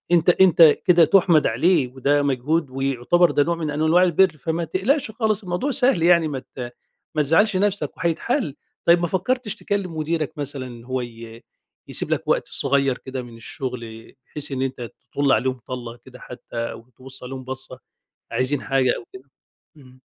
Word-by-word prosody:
أنت 170 +1 +3
أنت 180 -1 +5 0.2
كده 175 -2 +6
تُحمَد 175 -4 +4
عليه 145 +4 +2
وده 140 +3 +1
مجهود 140 +3 0
ويعتبر 135 +6 +1
ده 145 - +3
نوع 170 +3 -1
من 160 -2 -4
أنواع 155 +4 +3
البِر، 180 -1 +3
فما 160 +4 -2
تقلقش 230 - 0
خالص 220 -2 -1
الموضوع 185 +10 -2
سهل 250 -10 +2
يعني 170 -2 +5
ما 140 -3 -4
ت 125 -1 -9 0.4
ما 155 - +3
تزعَّلش 185 +8 +3
نَفْسك 205 +1 -1
وهيتحل. 170 - -1 0.3
طيب 170 +1 +6
ما 175 - 0
فكّرتش 210 +5 -1
تكلِّم 195 -6 -3
مديرك 160 0 -2
مثلًا 140 -2 -5
إن 120 -2 -11
هو 130 +1 -3
ي 115 -1 -10 0.4
يسيب - - -3
لك - - -1
وقت - - +1
صغير 140 -2 0
كده 130 0 -6
من 120 -1 -12
الشُغل 115 -2 -7
بحيث 150 -1 -5
إن 130 -1 -2
أنت 130 -3 -4 0.2
تطُل 140 -1 +1
عليهم 130 -1 +1
طَلّة 120 -2 -6
كده 125 +1 -15
حتّى 125 - -12 0.2
أو 115 +2 -12
تبُص 130 0 -9
عليهم 130 +1 -7
بَصّة، 130 0 -7 0.5
عايزين 130 +2 0
حاجة 135 -2 +2
أو - - -10
كده؟ 130 +2 -13 0.5
إمم. 130 -3 -18
145 Hz, 175 wpm, -22 LUFS, 130-175 Hz, 0.5 s, كده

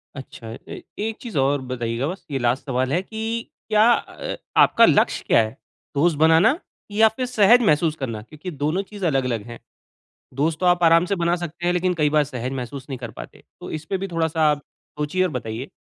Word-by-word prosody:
अच्छा 130 -4 -10 0.2
ए - - -7 0.2
एक 220 0 -3
चीज़ 230 - -6
और 140 +1 +2
बताइएगा 125 0 -3
बस, 185 +4 -6
ये 135 - -1
लास्ट 120 +2 0
सवाल 130 -1 -1
है 175 - +2
कि 220 +3 -8 0.5
क्या 215 +2 +5
अ, - - -4 0.2
आपका - - +6
लक्ष्य - - +2
क्या - - +5
है? 110 +4 -7 0.4
दोस्त 155 +2 +2
बनाना 160 - +4 0.3
या 220 +2 +5
फिर 255 +4 -4
सहज 245 -1 +5
महसूस 155 -5 +2
करना? 115 -7 -5
क्योंकि 155 - -9
दोनों 150 +5 -1
चीज़ 205 -3 -5
अलग-अलग 130 -7 0
हैं। 120 0 -9 0.8
दोस्त 155 +2 +1
तो 185 - -1
आप 175 0 +3
आराम 165 +1 +5
से 200 - -1
बना 170 -1 +1
सकते 175 0 -6
हैं, 175 - +2
लेकिन 180 +1 +1
कई 150 -3 +1
बार 150 0 +3
सहज 130 -3 -5
महसूस 130 +2 -7
नहीं 130 -3 -5
कर 120 -2 -7
पाते, - - -11 0.2
तो - - -8
इस 155 0 -5
पे 195 - 0
भी 195 +1 -4
थोड़ा-सा 165 -2 -1
आप 145 -1 -2 0.4
सोचिए 150 +5 0
और 185 - +1
बताइए। 115 -1 -5
155 Hz, 210 wpm, -22 LUFS, 130-180 Hz, 0.8 s, आपका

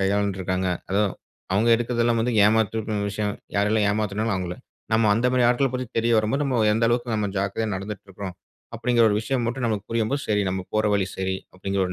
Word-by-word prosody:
கையாண்டு 100 0 +1
இருக்காங்க. 95 0 -1 0.2
அதும் 100 0 +2 0.4
அவுங்க 105 +5 +2
எடுக்கிறதெல்லாம் 120 0 +1
வந்து 120 +2 0
ஏமாற்றுனு 110 0 +1
விஷயம் 105 0 -2 0.2
யாரெல்லாம் 105 +1 +2
ஏமாத்துனாங்களோ 105 +1 -1
அவுங்கள. 90 -1 -4 0.4
நம்ம 110 0 +4
அந்த 115 +4 +1
மா 130 - +1
ரி - - +4
ஆட்கள 130 +3 +2
பத்தி 125 0 -2
தெரிய 115 +1 +2
வரும்போது, 110 +7 0
நம்ம 130 -5 +1
எந்த 115 +1 +1
அளவுக்கு 120 0 0
நாம 105 -1 0
ஜாக்கிரதையா 100 +3 -1
நடந்துட்டு 100 +1 -6
இருக்கிறோம், 95 -1 -7 0.4
அப்டிங்கிற 120 0 +2
ஒரு 105 - +1
விஷயம் 130 +2 -1
மட்டும் 125 +2 -2
நமக்கு 105 -3 -1
புரியும்போது, 115 +5 0
சரி 105 -1 +1
நாம 95 0 -3
போற 110 0 +2
வழி 100 -2 +1
சரி 95 0 -1 0.2
அப்டிங்கிற 95 +1 -2
ஒரு 90 - -4
110 Hz, 195 wpm, -24 LUFS, 100-115 Hz, 0.4 s, நம்ம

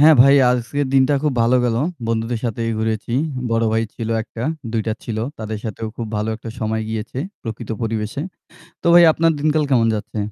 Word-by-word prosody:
হ্যাঁ, 155 +2 +8
ভাই 140 +1 +6 0.2
আজকের 125 +4 -1
দিনটা 135 +2 +4
খুব 150 -2 +1
ভালো 120 +2 +4
গেলো। 115 -1 +1 0.3
বন্ধুদের 115 0 -1
সাথেই 115 0 -1
ঘুরেছি। 110 +1 -2 0.4
বড় 115 0 +2
ভাই 110 - +2
ছিল 115 - -4
১ - - -14
টা, 115 - -2 0.3
২ 115 - 0
টা 110 - +1
ছিল। 110 -2 -3 0.2
তাদের 110 -1 -4
সাথেও 110 0 -4
খুব 115 - -4
ভালো 105 +1 -1
একটা 115 0 -8
সময় 110 0 -1
গিয়েছে 110 +3 -4 0.2
প্রকৃত 115 -1 -6
পরিবেশে। 110 +2 -2 0.6
তো - - -4
ভাই 175 0 +9
আপনার 165 +1 +2
দিনকাল 155 0 +2
কেমন 120 -4 +4
যাচ্ছে? 105 +1 -5
115 Hz, 190 wpm, -20 LUFS, 110-130 Hz, 0.6 s, ভাই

